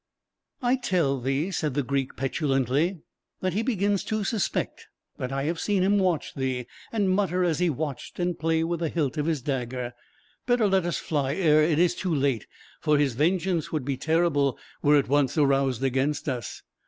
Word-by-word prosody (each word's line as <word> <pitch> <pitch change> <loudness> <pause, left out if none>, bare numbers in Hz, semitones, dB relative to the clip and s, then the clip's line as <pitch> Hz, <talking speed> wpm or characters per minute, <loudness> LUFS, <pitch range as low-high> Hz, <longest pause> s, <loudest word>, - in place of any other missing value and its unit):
"I 250 +2 +3
tell 170 - +1
thee," 135 +8 -1
said 150 -7 -2
the 145 - +1
Greek, 135 0 -2
petulantly, 135 +4 0 0.4
"that 185 -2 0
he 210 - +1
begins 205 -5 0
to 215 -1 -1
suspect; 205 -2 -2 0.3
that 125 - -3
I 135 0 -1
have 165 +3 -1
seen 200 -3 +1
him 200 +2 +3
watch 180 -5 0
thee, 130 -2 -2 0.3
and 210 -4 +1
mutter 185 -1 +1
as 165 -4 +1
he 180 -1 +3
watched, 145 -2 -4
and 175 -1 -1
play 160 0 +1
with 170 0 -1
the 165 -2 -1
hilt 150 -5 -1
of 150 - 0
his 155 -6 -1
dagger. 125 -2 -3 0.5
Better 245 -3 +3
let 190 -3 +2
us 175 - -1
fly 140 -3 -1
ere 155 -5 +4
it 155 0 +2
is 175 +1 +4
too 180 -3 -2
late, 135 -5 0 0.3
for 150 -1 +2
his 145 -3 +2
vengeance 170 +4 0
would 150 -5 -2
be 140 -1 -1
terrible 155 -3 +1 0.2
were 150 0 +5
it 140 - +1
once 140 +1 +2
aroused 135 -3 +2
against 135 +3 0
us. 125 -6 -4
155 Hz, 190 wpm, -26 LUFS, 135-180 Hz, 0.5 s, were